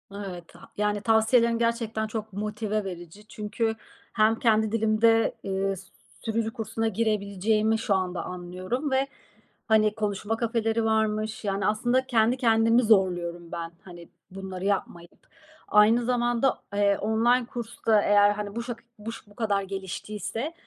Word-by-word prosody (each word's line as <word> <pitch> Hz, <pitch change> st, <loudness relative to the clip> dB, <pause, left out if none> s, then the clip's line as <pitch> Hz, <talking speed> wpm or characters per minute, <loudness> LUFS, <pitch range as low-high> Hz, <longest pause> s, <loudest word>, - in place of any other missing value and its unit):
Evet. 185 Hz, -4 st, -8 dB
Ha -, -, -15 dB
yani, 210 Hz, 0 st, 0 dB
tavsiyelerin 230 Hz, +2 st, +3 dB
gerçekten 230 Hz, -2 st, -1 dB
çok 215 Hz, -1 st, -6 dB
motive 215 Hz, +1 st, -2 dB
verici. 185 Hz, +2 st, -9 dB
Çünkü 220 Hz, +1 st, -2 dB, 0.4 s
hem 220 Hz, 0 st, +3 dB
kendi 220 Hz, -3 st, +2 dB
dilimde, 225 Hz, +1 st, +3 dB
eee, 195 Hz, 0 st, -1 dB
s 190 Hz, 0 st, -12 dB, 0.4 s
sürücü 225 Hz, 0 st, -1 dB
kursuna 225 Hz, 0 st, -2 dB
girebileceğimi 215 Hz, 0 st, +1 dB
şu 220 Hz, -2 st, 0 dB
anda 180 Hz, -2 st, -2 dB
anlıyorum 185 Hz, +10 st, -4 dB
ve, 265 Hz, +1 st, +2 dB, 0.6 s
hani, 215 Hz, -1 st, +3 dB
konuşma 210 Hz, +1 st, -2 dB
kafeleri 225 Hz, -1 st, 0 dB
varmış. 220 Hz, 0 st, 0 dB
Yani, 200 Hz, 0 st, -1 dB
aslında 240 Hz, +5 st, +1 dB
kendi 235 Hz, 0 st, +3 dB
kendimi 230 Hz, 0 st, +4 dB
zorluyorum 175 Hz, -5 st, +1 dB
ben, 165 Hz, -1 st, -5 dB
hani, 175 Hz, -2 st, -12 dB, 0.2 s
bunları 190 Hz, -1 st, -6 dB
yapmayıp. 175 Hz, -3 st, -3 dB, 0.4 s
Aynı 220 Hz, +3 st, +5 dB
zamanda, 240 Hz, +1 st, +1 dB
eee, 200 Hz, -1 st, +3 dB
online 235 Hz, +4 st, +2 dB
kurs 235 Hz, -1 st, -7 dB
da 215 Hz, -2 st, +5 dB
eğer, 205 Hz, 0 st, +5 dB
hani, 205 Hz, 0 st, -5 dB
buşak 235 Hz, 0 st, -5 dB, 0.2 s
buş 225 Hz, 0 st, -8 dB
bu 205 Hz, -, -19 dB
kadar 205 Hz, -4 st, 0 dB
geliştiyse 205 Hz, -, -5 dB
215 Hz, 135 wpm, -26 LUFS, 200-230 Hz, 0.6 s, Aynı